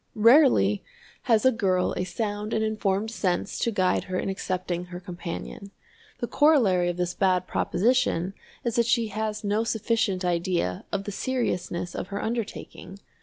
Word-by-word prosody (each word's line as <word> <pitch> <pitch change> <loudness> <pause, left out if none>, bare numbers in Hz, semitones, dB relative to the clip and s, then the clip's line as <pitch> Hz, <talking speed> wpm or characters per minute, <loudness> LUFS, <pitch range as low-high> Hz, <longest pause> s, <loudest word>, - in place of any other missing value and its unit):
Rarely 225 - +5 0.5
has 225 -1 +4
a 260 - +7
girl 190 -6 +1
a - - -1
sound 210 +2 -3
and 220 - +1
informed 215 -1 -1
sense 190 -4 -1
to - - +1
guide 185 -4 +1
her 185 0 -3
in - - -2
accepting 185 -2 -3
her 180 0 -8
companion. 180 +2 -7 0.5
The - - -2
corollary 220 - +3
of 175 - -3
this 180 0 -1
bad 185 -2 +2
proposition 200 -5 +1 0.3
is 235 -1 -1
that 235 -1 +3
she 235 -2 +2
has 215 +1 -3
no 210 +2 +1
sufficient 220 -4 0
idea 170 - -1
of 200 -1 -1
the 205 - -5
seriousness 180 -7 -2
of - - -4
her 200 0 -4
undertaking. 220 -4 -5
200 Hz, 160 wpm, -26 LUFS, 180-225 Hz, 0.5 s, a